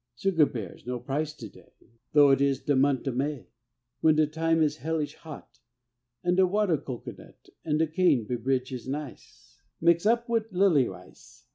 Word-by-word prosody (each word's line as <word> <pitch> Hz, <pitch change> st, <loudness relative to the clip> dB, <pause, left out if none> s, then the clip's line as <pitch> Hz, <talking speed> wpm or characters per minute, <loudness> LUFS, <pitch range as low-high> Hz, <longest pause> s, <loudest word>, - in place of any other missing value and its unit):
Sugar 165 Hz, +1 st, +2 dB
bears 110 Hz, -2 st, -8 dB
no 125 Hz, 0 st, -2 dB
price 145 Hz, +5 st, -3 dB
to 115 Hz, -, -9 dB
day, -, -, -19 dB, 0.4 s
Though 145 Hz, -2 st, +6 dB
it 135 Hz, -, +3 dB
is 140 Hz, -1 st, +2 dB
de 145 Hz, -, +1 dB
mont' 135 Hz, 0 st, +1 dB
o' -, -, +1 dB
May, 135 Hz, +2 st, -3 dB, 0.5 s
When 155 Hz, -1 st, +4 dB
de 155 Hz, 0 st, +4 dB
time 165 Hz, +2 st, 0 dB
is 150 Hz, 0 st, 0 dB
hellish 155 Hz, -1 st, -3 dB
hot, 155 Hz, -3 st, -12 dB, 0.6 s
An' 175 Hz, 0 st, +2 dB
de 185 Hz, +1 st, +4 dB
water 190 Hz, -5 st, +1 dB
cocoanut 130 Hz, -4 st, -10 dB
An' 150 Hz, -2 st, 0 dB
de 160 Hz, -, +2 dB
cane 155 Hz, -, +2 dB
bebridge 125 Hz, +2 st, -2 dB
is 125 Hz, 0 st, -7 dB
nice, 140 Hz, -1 st, -8 dB, 0.2 s
Mix' 170 Hz, +3 st, +3 dB
up 235 Hz, +1 st, +2 dB
wid 230 Hz, -2 st, 0 dB
a 180 Hz, -, -8 dB
lilly 170 Hz, -10 st, +4 dB
ice. -, -, -15 dB
150 Hz, 180 wpm, -27 LUFS, 135-165 Hz, 0.6 s, Though